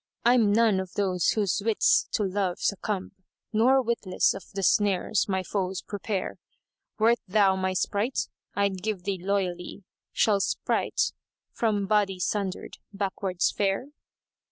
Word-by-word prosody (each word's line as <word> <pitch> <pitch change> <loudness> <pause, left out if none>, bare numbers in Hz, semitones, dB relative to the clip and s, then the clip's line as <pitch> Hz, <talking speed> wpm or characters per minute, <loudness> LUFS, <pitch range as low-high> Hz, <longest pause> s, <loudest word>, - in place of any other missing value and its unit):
I'm 235 -4 +5
none 215 -2 +4
of 190 -1 -6
those 185 -4 0
whose 205 -3 0
wits 225 -1 +3
to 210 - +1
love 190 -2 -1
succumb 200 -1 -2 0.2
* - - -54
Nor 255 +5 +4
witless 230 -6 +1
of 195 - -8
the 195 - -2
snares 205 +1 +2
my 190 -1 0
foes 190 -1 -3
prepare: 200 -1 -4 0.6
Wert 230 +2 +3
thou 195 0 +4
my 190 0 -1
sprite, 205 +6 -1 0.3
I'd 200 -2 0
give 210 -3 -3
thee 195 -1 -2
loyally; 185 -1 -2 0.2
* - - -67
Shall 205 -2 +2
sprite, - - 0 0.4
from 210 -3 0
body 200 -2 +1
sundered, 190 +1 -3
backwards 195 -2 -1
fare?" 200 +7 -1
200 Hz, 140 wpm, -27 LUFS, 190-215 Hz, 0.6 s, I'm